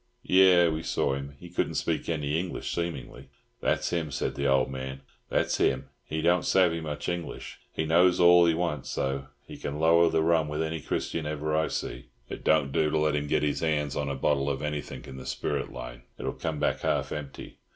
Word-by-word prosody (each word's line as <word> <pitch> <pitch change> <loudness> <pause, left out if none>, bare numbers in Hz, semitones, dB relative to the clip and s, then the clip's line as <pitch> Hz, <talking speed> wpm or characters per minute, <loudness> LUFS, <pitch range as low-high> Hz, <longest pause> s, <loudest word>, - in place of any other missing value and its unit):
"Yes, 90 -3 +6
we 80 - -3
saw 70 - 0
him. 70 +1 -5
He 90 - -10
couldn't 85 - -2
speak - - -1
any 75 -1 0
English, 90 0 -4
seemingly." 70 -5 -5 0.3
"That's - - 0
him," 85 -3 -1
said 70 - -2
the 70 0 -1
old 70 -1 +3
man. 65 0 -6 0.3
"That's - - +1
him! 65 0 +1
He 80 0 -4
don't 90 +1 +3
savvy 85 -3 +3
much 75 -2 -5
English. 85 -1 -5
He 80 - -2
knows 90 +3 +4
all 85 0 +7
he 80 - +3
wants, 80 -5 -2
though. 70 0 -2 0.2
He - - -10
can 70 +1 -4
lower 85 +1 +5
the 80 - +2
rum 80 -2 +3
with 75 +2 -2
any 80 -1 -3
Christian 80 +2 -2
ever 75 0 -2
I 80 +1 +2
see. - - -4 0.2
It - - -7
don't 75 -3 +3
do 75 +2 +2
to 80 - 0
let 75 -1 +2
him 75 0 -1
get 75 - +1
his 75 -1 0
hands 75 -3 0
on 70 -1 -1
a 70 - -2
bottle 70 +1 +1
of 70 0 -3
anythink 75 -1 -4
in 65 - -9
the 65 - -9
spirit - - -2
line. - - -8 0.2
It'll - - -3
come 80 -2 -3
back - - +1
half - - 0
empty. 75 -2 -7
75 Hz, 215 wpm, -28 LUFS, 70-85 Hz, 0.3 s, all